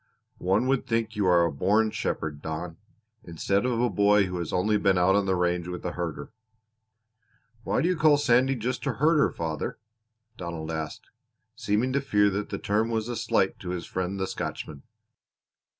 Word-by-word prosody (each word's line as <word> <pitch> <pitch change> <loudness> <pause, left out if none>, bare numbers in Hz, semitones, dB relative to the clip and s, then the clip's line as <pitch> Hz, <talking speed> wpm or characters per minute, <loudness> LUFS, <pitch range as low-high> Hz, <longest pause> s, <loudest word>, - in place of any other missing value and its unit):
"One 95 +6 +1
would 135 0 0
think 115 -1 -1
you 100 -3 +1
a 85 -2 +4
born 105 +9 +2
shepherd, 75 -7 -3
Don, 80 +1 -5 0.5
instead 100 +7 -1
of 120 -2 0
a 125 - +3
boy 105 -2 +4
who 90 -1 -4
has 85 - -4
only 105 +4 +1
been 100 -2 +2
out 90 +2 +4
on 100 -1 +1
the 95 - +2
range 90 -1 0
with 90 0 -6
a 90 - -1
herder." 85 -5 -5 1.3
"Why - - 0
do - - +2
you 180 - +2
call 155 -2 +5
Sandy 130 -1 +3
just 125 +4 -3
a 135 - +1
herder, 150 +5 +3
father?" 80 -3 -4 0.6
Donald 85 -2 -5
asked, 80 -2 -6 0.4
seeming 115 +6 0
to 140 - +1
fear 105 -6 +3
that 100 +2 -3
the - - -3
term 110 +3 0
was 110 0 -2
a 120 - -3
slight - - 0
to - - -7
his 90 -2 -4
friend 95 +1 -3
the 95 - 0
Scotchman. 75 -5 -5
100 Hz, 180 wpm, -27 LUFS, 85-115 Hz, 1.3 s, call